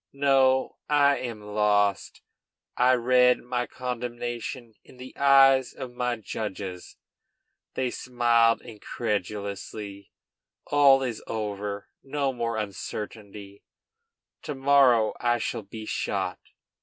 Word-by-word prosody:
No, 135 -1 +2
I 145 -1 +4
am 115 -4 -6
lost. 105 -1 0 0.5
I 125 +1 +4
read 125 +1 +4
my 125 0 -2
condemnation 120 -1 -5
in - - -18
the 130 +1 -11
eyes 135 -2 +5
of 130 -2 -7
my 125 0 -1
judges. 100 -4 -6 0.8
They 130 -2 -1
smiled 120 -2 +2
incredulously. 100 -2 -5 0.5
All 140 -2 +5
is 120 -4 -4
over. 105 -2 -4
No 140 -1 -2
more 115 -2 -2
uncertainty. 100 -1 -7 0.8
To 150 - -5
morrow 135 -5 +4
I 120 0 +1
shall 115 - -3
be 110 +2 -9
shot. - - -2
120 Hz, 105 wpm, -26 LUFS, 105-130 Hz, 0.8 s, eyes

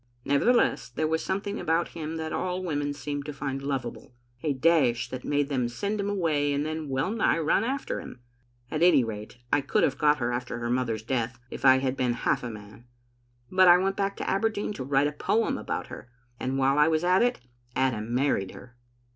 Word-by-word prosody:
Nevertheless, 140 - +2
there 155 +6 -2
was 160 +1 0
something 200 +2 -2
about 165 +2 0
him 160 -1 -5
that 160 0 -4
all 185 0 -2
women 145 -4 -1
seemed 145 0 -4
to 150 - -4
find 135 -1 -4
lovable, 125 -4 -4 0.3
a 155 - 0
dash 130 -5 +2
that 130 -1 -5
made 145 -1 0
them 130 -4 0
send 200 - -3
him 200 0 -1
away 155 -7 +1
and 145 +1 -1
then 155 -1 -4
well 135 +7 0
nigh 225 -6 +2
run 165 +5 +2
after 270 +4 -2
him. - - -10 0.5
At 155 - -2
any 170 -7 +6
rate, 110 0 -6 0.2
I 145 - +4
could 140 - +1
have 135 - +1
got 150 0 +4
her 120 -2 -1
after 120 -1 -3
her 120 0 -3
mother's 115 -4 -1
death 120 0 -2
if - - -7
I 130 0 +8
had 130 0 -1
been 125 -2 0
half 120 - 0
a 125 - -5
man. 105 +1 -11 0.7
But 185 0 +5
I 175 0 +9
went 195 +1 0
back 200 0 -1
to - - -4
Aberdeen 210 +1 0
to 135 - -5
write 135 +1 +2
a 145 - 0
poem 220 +9 0
about - - -3
her, 125 - -10 0.3
and 130 +1 -2
while 135 +2 +3
I 150 - +6
was 160 0 +1
at 180 +1 +4
it 245 - +1 0.3
Adam 120 -4 0
married 120 -7 0
her." 120 -1 -13
145 Hz, 215 wpm, -27 LUFS, 125-170 Hz, 0.7 s, I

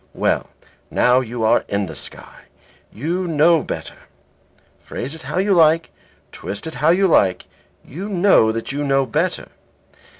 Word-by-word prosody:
Well, - - 0 0.4
now 125 +1 +3
you 120 -2 -4
are 110 - +3
in 100 0 -1
the 80 -3 -9
sky, - - -8 0.5
you 175 - -3
know 160 0 +3
better. - - -7 0.7
Phrase 135 +4 -6
it 160 - -10
how - - -5
you 195 +2 +2
like, 165 -1 +3 0.4
twist 100 - -6
it 160 - -6
how 140 +5 +1
you 190 +3 +4
like, 95 - +2 0.4
you 185 +10 -7
know 180 - +4
that 115 +2 -4
you 145 +1 -3
know 135 -1 +2
better. 165 +7 -2
150 Hz, 155 wpm, -20 LUFS, 125-175 Hz, 0.7 s, you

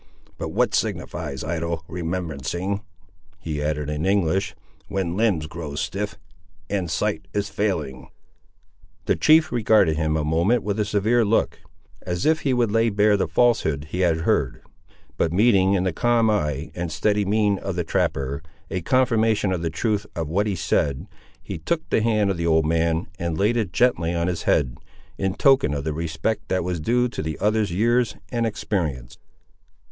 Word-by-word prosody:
But - - -3
what - - +1
signifies 70 -3 -2
idle 85 0 -3
remembrancing," 85 +2 -3 0.6
he 80 -2 -4
added 75 -1 -1
in 75 +1 -3
English, 95 -1 +1 0.3
"when 90 -3 -2
limbs 100 -8 +1
grow 75 -2 -7
stiff, 100 +8 -3 0.5
and 95 -4 -1
sight - - -1
is 100 -1 -1
failing!" 80 -11 -2 1.0
The - - +2
chief 155 0 +4
regarded 110 -9 +3
him 80 -1 0
a 75 - -1
moment 85 +10 +2
with 105 +1 -2
a 105 - +1
severe 110 +3 +2
look, 110 +1 +1 0.4
as 90 0 -3
if 155 0 +3
he 140 -2 0
would 120 -4 +1
lay 115 +1 +3
bare 105 0 +3
the 100 - 0
falsehood 80 - +1
he 90 - -3
had 85 -3 +2
heard; - - 0 0.5
but 80 - +1
meeting 100 -1 +4
in 90 - +1
the 95 -2 0
calm 115 +2 +2
eye 75 -6 -1
and 85 -2 -4
steady 105 +6 +1
mien 105 0 +1
of 95 -2 -4
the 90 - -1
trapper 70 -3 -1 0.3
a 95 - -2
confirmation 110 -2 +2
of 90 -3 -1
the 85 - -1
truth 105 +5 -1
of 80 -2 -2
what 100 +7 0
he 100 - -1
said, 75 -2 0 0.4
he - - -6
took 160 - -2
the - - +3
hand 105 -3 +2
of 95 - -3
the 85 0 -1
old 80 -1 +3
man 80 +1 +1
and 85 -2 -2
laid 105 +4 +2
it 110 -6 -1
gently 85 -4 +2
on 85 0 0
his 90 -1 -2
head, 65 -4 +1 0.4
in 95 0 -1
token 135 - +4
of 70 - -3
the 80 0 -2
respect 80 +7 -2
that 95 -1 0
was 90 -1 -2
due 125 +9 +2
to 120 - -5
the 80 -2 -4
other's 105 -2 +1
years 120 +5 +2 0.2
and 115 -1 0
experience. 80 - -3
95 Hz, 175 wpm, -23 LUFS, 80-110 Hz, 1.0 s, chief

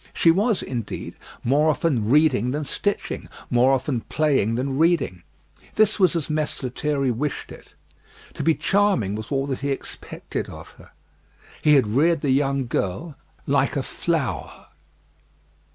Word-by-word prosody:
She 165 - +5
was, 205 +4 +1
indeed, 120 -4 -5 0.3
more 145 +6 +3
often 140 -8 0
reading 135 -4 +4
than 145 +3 -2
stitching; 205 +8 -3 0.2
more 125 +2 +4
often 130 -2 0
playing 135 -8 +1
than 135 +3 -2
reading. 160 - +2 0.5
This 215 0 +3
was 185 -2 +4
as 165 -4 0
Mess 155 -2 -2
Lethierry 135 +1 -1
wished 140 +5 -3
it. - - -14 0.6
To - - -5
be 160 -1 +3
charming 195 - +1
was 110 +4 -6
all 135 -1 0
that 135 -2 -3
he 140 - -2
expected 135 - -5
of - - -11
her. - - -15 0.7
He 150 -1 +5
had 135 -4 +4
reared 145 +9 +2
the 140 - +1
young 135 0 +1
girl 120 - -3 0.3
like - - +1
a - - 0
flower. - - -3
140 Hz, 150 wpm, -23 LUFS, 125-160 Hz, 0.7 s, She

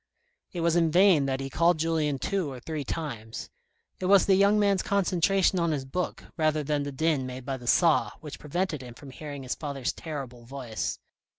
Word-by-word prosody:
It 175 - -4
was 170 0 +2
in 165 -2 +3
vain 175 -4 +5
that 135 0 -1
he 135 - -3
called 170 +5 +3
Julien 155 -3 0
two 175 +2 -1
or 130 - -7
three 155 +2 -4
times. 120 -9 -5 0.5
It 185 - -2
was 195 0 +6
the 195 - +4
young 200 +2 +5
man's 200 -2 +3
concentration 190 -1 +2
on 170 -1 +1
his 145 -4 -2
book, 180 +7 -3
rather 155 -1 +1
than 145 0 0
the 145 0 -4
din 140 -2 0
made 130 0 -7
by 135 -1 -2
the 120 -1 -11
saw, 165 +3 +4
which 150 -2 -9
prevented 160 0 -2
him 120 -2 -10
from 135 +1 -11
hearing 145 0 -7
his 130 - -2
father's 140 -4 -3
terrible 135 -7 -7
voice. 120 -3 -4
155 Hz, 200 wpm, -27 LUFS, 135-175 Hz, 0.5 s, was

